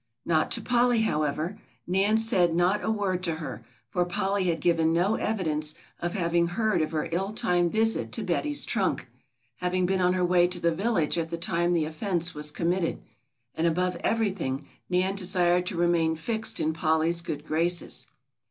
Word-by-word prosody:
Not 160 -2 +2
to - - -1
Polly, 245 -1 +2
however; 155 +2 -1 0.3
Nan 195 +4 +2
said 180 -7 +2
not 180 +4 +2
a - - -1
word 200 -4 0
to 170 -3 -1
her, 160 -1 -7 0.2
for 180 -4 0
Polly 195 +2 -1
had 170 -2 0
given 165 0 +2
no 175 +5 +2
evidence 155 -9 -1 0.2
of 175 +2 -3
having 170 -2 +1
heard 205 0 0
of 155 - 0
her 155 -2 -2
ill 190 +4 -1
timed 180 -6 +1
visit 225 +1 0
to 225 - 0
Betty's 290 - 0
trunk, 195 - -1 0.5
having 180 +2 0
been 190 +1 +1
on 180 0 +3
her 180 -1 +1
way 175 0 +4
to 180 0 -3
the 170 -1 +1
village 175 -4 +1
at 165 0 -3
the 170 - -3
time 175 0 0
the 165 -3 +2
offence 170 +2 -1
was 150 0 -2
committed, 170 +2 -1 0.5
and 165 - 0
above 180 +2 0
everything 180 -11 -1 0.2
Nan 185 +1 +1
desired 180 -2 +2
to 180 - -2
remain 170 -2 +2
fixed 220 +7 -1
in 160 - 0
Polly's 160 +1 +1
good 150 -3 -5
graces. 170 +3 0
175 Hz, 180 wpm, -27 LUFS, 165-195 Hz, 0.5 s, way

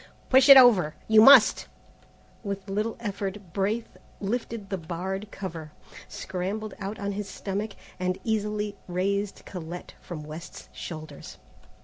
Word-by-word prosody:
"Push 265 +2 +6
it 275 - +12
over. 210 -12 +6
You 220 0 +7
must!" 265 0 +7 0.8
With 200 -1 -5
little 215 +3 -2
effort 200 -4 -5
Braith 210 +4 -2 0.2
lifted 220 -1 -4
the 195 - -1
barred 185 +5 -5
cover, 165 -7 -7 0.3
scrambled 195 +3 -5
out 200 +2 -5
on 200 -1 -3
his 200 0 -5
stomach, 200 +2 -4 0.3
and 185 0 -1
easily 210 -1 -2
raised 195 +3 -2
Colette 175 -1 -8
from 160 -4 -7
West's 155 +3 -10
shoulders. 155 -2 -8
200 Hz, 125 wpm, -26 LUFS, 180-215 Hz, 0.8 s, it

